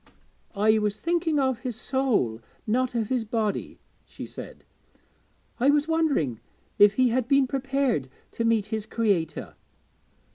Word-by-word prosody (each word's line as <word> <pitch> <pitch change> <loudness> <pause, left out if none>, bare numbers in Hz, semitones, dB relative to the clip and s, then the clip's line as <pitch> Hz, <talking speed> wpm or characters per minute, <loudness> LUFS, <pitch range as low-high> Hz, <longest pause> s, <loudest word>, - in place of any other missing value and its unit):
'I 215 +2 +3
was 210 0 -1
thinking 335 -2 0
of 260 -3 +1
his 255 -3 -4
soul, 225 - 0 0.2
not 245 +3 0
of 225 -3 -1
his 255 -3 0
body,' 215 -2 -2 0.3
she - - -9
said. - - -10 1.0
'I 260 +3 +4
was 295 +1 +3
wondering 285 - +1 0.4
if 205 0 +7
he 255 +1 +4
had 245 0 0
been 275 0 +4
prepared 270 - -1 0.2
to 230 - -3
meet 230 -3 +2
his 215 0 -3
Creator.' 200 -8 -1
235 Hz, 140 wpm, -26 LUFS, 210-270 Hz, 1.0 s, if